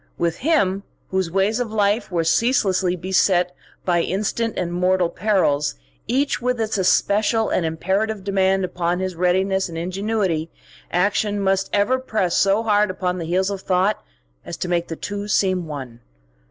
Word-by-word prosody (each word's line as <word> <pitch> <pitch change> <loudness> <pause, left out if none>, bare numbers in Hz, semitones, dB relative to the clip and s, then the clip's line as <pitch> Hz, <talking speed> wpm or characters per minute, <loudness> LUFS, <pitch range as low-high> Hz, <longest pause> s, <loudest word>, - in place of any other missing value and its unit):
With 170 -1 -1
him, 200 - +1 0.3
whose 190 -2 0
ways 195 +6 +1
of 240 -3 -2
life 205 0 +1
were 170 -2 +1
ceaselessly 190 -2 +2
beset 180 0 +1 0.3
by 175 -2 +2
instant 215 +5 -2
and 175 -1 -2
mortal 180 0 +2
perils, 180 - +1 0.3
each 275 +1 0
with 250 0 0
its 220 -2 -1
especial 210 +4 +2
and 170 - 0
imperative 190 +6 -1
demand 190 -1 +1
upon 175 0 -2
his 185 -1 -3
readiness 190 +2 +1
and 165 - -7
ingenuity, 185 -2 -1 0.4
action 205 +3 +1
must 195 0 +1
ever 205 +6 +2
press 215 -8 -1
so 200 +3 +3
hard 210 -2 +2
upon 185 -1 -2
the 165 - -4
heels 185 +4 0
of 195 -1 -4
thought 190 +3 +1 0.4
as 170 - -7
to - - -3
make 175 -1 0
the 165 - -5
two 205 +4 -5
seem 185 -4 +1
one. 130 -6 -7
190 Hz, 160 wpm, -21 LUFS, 180-210 Hz, 0.4 s, so